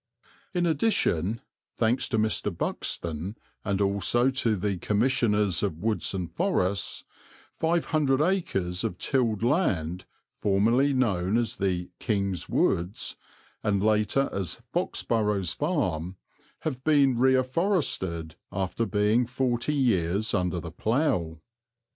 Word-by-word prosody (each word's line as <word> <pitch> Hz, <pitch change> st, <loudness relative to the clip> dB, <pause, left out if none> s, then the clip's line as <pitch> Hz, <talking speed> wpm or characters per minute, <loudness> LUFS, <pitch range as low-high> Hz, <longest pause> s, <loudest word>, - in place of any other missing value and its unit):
In 175 Hz, -1 st, +2 dB
addition, 115 Hz, -, +1 dB, 0.4 s
thanks 115 Hz, +3 st, +1 dB
to 110 Hz, -, 0 dB
Mr. 110 Hz, -1 st, +1 dB
Buxton 85 Hz, +5 st, -3 dB, 0.3 s
and 100 Hz, -1 st, -1 dB
also 100 Hz, +6 st, +2 dB
to 120 Hz, -4 st, +1 dB
the 100 Hz, -1 st, -2 dB
Commissioners 105 Hz, -4 st, +2 dB
of 95 Hz, -7 st, -1 dB
Woods 105 Hz, +1 st, -1 dB
and 90 Hz, -3 st, -4 dB
Forests, 100 Hz, -, 0 dB, 0.5 s
five 165 Hz, +1 st, 0 dB
hundred 140 Hz, -4 st, +2 dB
acres 120 Hz, -, 0 dB
of 90 Hz, -, -2 dB
tilled 115 Hz, -4 st, 0 dB
land, 95 Hz, -, 0 dB, 0.3 s
formerly 115 Hz, +8 st, +2 dB
known 105 Hz, -6 st, +1 dB
as 120 Hz, -1 st, -1 dB
the 90 Hz, -2 st, -1 dB
"King's 100 Hz, -6 st, -1 dB
Woods" 90 Hz, +5 st, 0 dB, 0.5 s
and 100 Hz, -2 st, 0 dB
later 110 Hz, +5 st, +2 dB
as 95 Hz, -3 st, -2 dB
Fox -, -, -1 dB
Burrows 105 Hz, -6 st, 0 dB
Farm, 95 Hz, -, -1 dB, 0.5 s
have 130 Hz, -5 st, -4 dB
been 140 Hz, -4 st, +4 dB
reafforested 130 Hz, -, +1 dB, 0.2 s
after 95 Hz, +4 st, -2 dB
being 105 Hz, +5 st, +2 dB
forty 125 Hz, +2 st, 0 dB
years 105 Hz, -, +1 dB
under 90 Hz, -1 st, 0 dB
the 85 Hz, -2 st, -7 dB
plough. 105 Hz, -, 0 dB
105 Hz, 120 wpm, -27 LUFS, 95-130 Hz, 0.5 s, been